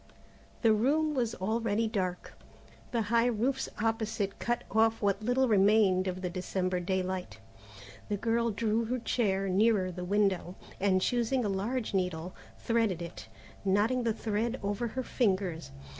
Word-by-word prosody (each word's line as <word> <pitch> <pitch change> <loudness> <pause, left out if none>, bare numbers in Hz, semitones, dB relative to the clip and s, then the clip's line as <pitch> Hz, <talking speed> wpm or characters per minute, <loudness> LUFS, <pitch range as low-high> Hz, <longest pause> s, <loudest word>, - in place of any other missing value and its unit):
The 225 -1 +6
room 300 +8 +2
was 240 -5 -1
already 220 +2 0
dark. 185 -4 -3 0.6
The 235 -2 +1
high 235 +1 +4
roofs 245 +3 0
opposite 220 -2 -1
cut 240 0 -1
off 225 +1 +3
what 200 0 +1
little 245 +4 +2
remained 200 -3 +4
of 185 0 -4
the 180 - -1
December 185 0 -1
daylight. 185 - -2 0.7
The 205 - 0
girl 235 +2 +1
drew 225 +1 0
her 250 +3 -1
chair 200 -5 0
nearer 195 -1 +2
the 180 0 -6
window, 190 -2 +1 0.2
and 190 -1 +2
choosing 245 0 +1
a - - 0
large 215 +5 -2
needle, 180 -2 -1 0.2
threaded 225 -6 0
it, 170 -10 -9 0.4
knotting 205 +6 +2
the 235 -1 +1
thread 225 +2 -2
over 205 +4 -1
her 255 +3 -4
fingers. 190 - -1
210 Hz, 145 wpm, -30 LUFS, 190-230 Hz, 0.7 s, The